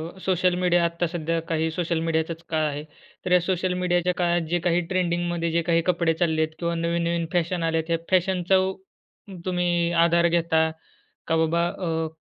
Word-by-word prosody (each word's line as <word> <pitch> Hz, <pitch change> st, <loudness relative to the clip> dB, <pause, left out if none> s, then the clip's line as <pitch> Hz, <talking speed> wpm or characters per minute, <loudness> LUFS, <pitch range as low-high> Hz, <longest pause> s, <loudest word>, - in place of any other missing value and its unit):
अ, -, -, -14 dB
social 180 Hz, -1 st, +2 dB
media, 175 Hz, -1 st, +3 dB
आत्ता 170 Hz, 0 st, -1 dB
सध्या 165 Hz, -1 st, -2 dB
काही 160 Hz, 0 st, 0 dB
सोशल 170 Hz, -1 st, -1 dB
मीडियाचाच 165 Hz, 0 st, -1 dB
काळ 155 Hz, -1 st, 0 dB
आहे. 145 Hz, +1 st, -4 dB, 0.4 s
तर 180 Hz, -, -2 dB
या 180 Hz, -, +6 dB
सोशल 185 Hz, 0 st, -1 dB
मीडियाच्या 175 Hz, 0 st, +1 dB
काळात 175 Hz, -1 st, +1 dB
जे 175 Hz, 0 st, +1 dB
काही 175 Hz, +1 st, +2 dB
ट्रेंडिंगमध्ये 175 Hz, -2 st, -1 dB
जे 170 Hz, +1 st, +1 dB
काही 165 Hz, 0 st, +2 dB
कपडे 170 Hz, -1 st, +1 dB
चालले 160 Hz, -1 st, 0 dB
आहेत 160 Hz, 0 st, -1 dB
किंवा 170 Hz, -1 st, -1 dB
नवीन-नवीन 170 Hz, 0 st, -1 dB
फॅशन 175 Hz, 0 st, 0 dB
आल्या 165 Hz, 0 st, +1 dB
आहेत, 160 Hz, -, -16 dB
या -, -, -20 dB
फॅशनचा 185 Hz, 0 st, +2 dB, 0.9 s
तुम्ही 175 Hz, -2 st, 0 dB
आधार 170 Hz, 0 st, +3 dB
घेता, 165 Hz, -1 st, +2 dB, 0.6 s
का 165 Hz, -, +1 dB
बाबा 170 Hz, +2 st, +1 dB
अ, 165 Hz, -3 st, -2 dB
170 Hz, 175 wpm, -24 LUFS, 165-175 Hz, 0.9 s, या